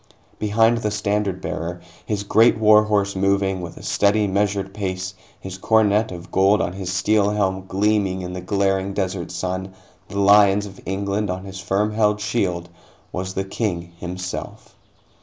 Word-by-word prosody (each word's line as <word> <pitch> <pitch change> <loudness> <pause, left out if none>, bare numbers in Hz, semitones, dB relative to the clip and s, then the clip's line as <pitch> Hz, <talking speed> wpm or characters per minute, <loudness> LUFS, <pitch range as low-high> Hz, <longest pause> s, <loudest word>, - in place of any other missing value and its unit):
Behind 110 +2 +3
the 105 - -1
standard 105 -2 -1
bearer, 85 +2 -4 0.3
his 105 -2 -2
great 110 +3 +4
war 110 0 +6
horse 100 -2 0
moving 95 -1 +1
with 85 - -8
a - - -11
steady, 105 +1 +2
measured 100 0 -1
pace, 95 -2 -3 0.3
his 95 0 -8
coronet 110 0 +3
of 90 0 -9
gold 100 +2 +4
on 90 - -1
his 95 -1 -4
steel 100 +2 +2
helm 95 -2 -1
gleaming 100 -1 +1
in 90 0 -5
the 90 - -5
glaring 95 0 0
desert 95 -3 -2
sun, 95 +1 -4 0.3
the 100 - -7
lions 100 0 +5
of 100 -1 -11
England 100 +2 -1
on 95 +1 -4
his 95 -1 -8
firm 100 +2 0
held 105 -1 +2
shield, 100 -5 -1 0.4
was 95 +1 -4
the 95 - 0
King 90 -4 -3
himself. 90 +1 -6
100 Hz, 160 wpm, -22 LUFS, 95-105 Hz, 0.4 s, war